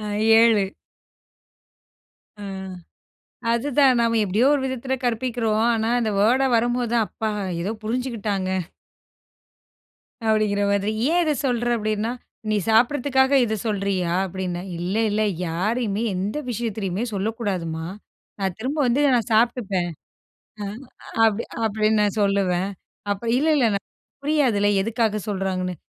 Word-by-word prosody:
ஆ. - - -8 0.4
7. 225 -3 +5 1.8
ஆ. - - -6 1.1
அதுதான், 265 +2 +3
நம்ம 230 -1 +2
எப்படியோ 210 +7 +2
ஒரு 285 - 0
விதத்துல 260 0 -2
கற்பிக்கிறோம். 230 -2 0
ஆனா, 225 0 0
அந்த 220 -2 0
வேர்ட 255 +6 +4
வரும்போது 240 0 0
தான், 225 -3 +3
"அப்பா! 220 -1 -3 0.3
ஏதோ 195 +5 -2
புரிஞ்சுக்கிட்டாங்க." 215 -5 -2 1.8
அப்படிங்கிற 210 -2 +2
மாதிரி. 200 +1 +1 0.2
"ஏன் 350 - +3
இத 305 - +2
சொல்ற? 240 -2 0
அப்படின்னா 215 +1 -1 0.4
நீ 215 - +2
சாப்பிட்டறதுக்காக 265 +3 +3
இத 220 0 -1
சொல்றியா?" 195 -4 -1
அப்படின்னேன். 185 0 -4
"இல்ல, 180 +4 -2
இல்ல. 210 +1 0 0.3
யாரையுமே 210 +5 -1
எந்த 200 +8 -2
விஷயத்திலயுமே 215 -4 -2
சொல்லக்கூடாதும்மா! 190 -6 -2 0.5
நான் 190 -2 -1
திரும்ப 270 +6 -3
வந்து, 240 +4 +2 0.2
நான் 230 -2 0
சாப்டுப்பேன்." 215 -6 +1 0.7
ஆ. - - -3 0.6
அப்படி 220 0 +2 0.2
அப்படின்னு 215 0 +2
நான் 205 +1 0
சொல்லுவேன். 195 -1 +1 0.4
அப்ப 200 +3 -2
இல்ல, 310 +3 +1
இல்ல. 250 -5 +3
ந 200 - +1 0.5
புரியாதுல்ல, 260 -9 +2
எதுக்காக 220 0 0
சொல்றாங்கன்னு. 185 -2 -2
220 Hz, 120 wpm, -23 LUFS, 200-240 Hz, 1.8 s, 7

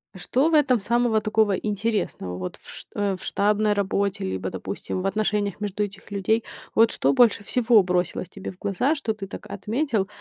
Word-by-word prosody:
Что 260 - +1
в - - -2
этом 265 -6 +4
самого 235 +1 +2
такого 215 -1 +2
интересного? 205 - -2
Вот 90 0 -5
в - - -15
ш - - -10
э, 200 -2 0
в - - -11
штабной 210 +1 +2
работе, 200 -1 0
либо, 95 0 -3
допустим, 95 - -4
в 195 - 0
отношениях 205 -1 0
между 210 0 -2
этих 200 0 -8
людей. 210 +3 +1 0.3
Вот 225 0 +5
что 140 +1 +2
больше 225 -4 +4
всего 235 -1 +4
бросилось 180 -1 -1
тебе 195 -1 -7
в 180 - -18
глаза, 205 - +1
что 230 -8 -2
ты 200 - -6
так 195 - -9
отметил? 220 0 -1
205 Hz, 190 wpm, -24 LUFS, 190-225 Hz, 0.3 s, Вот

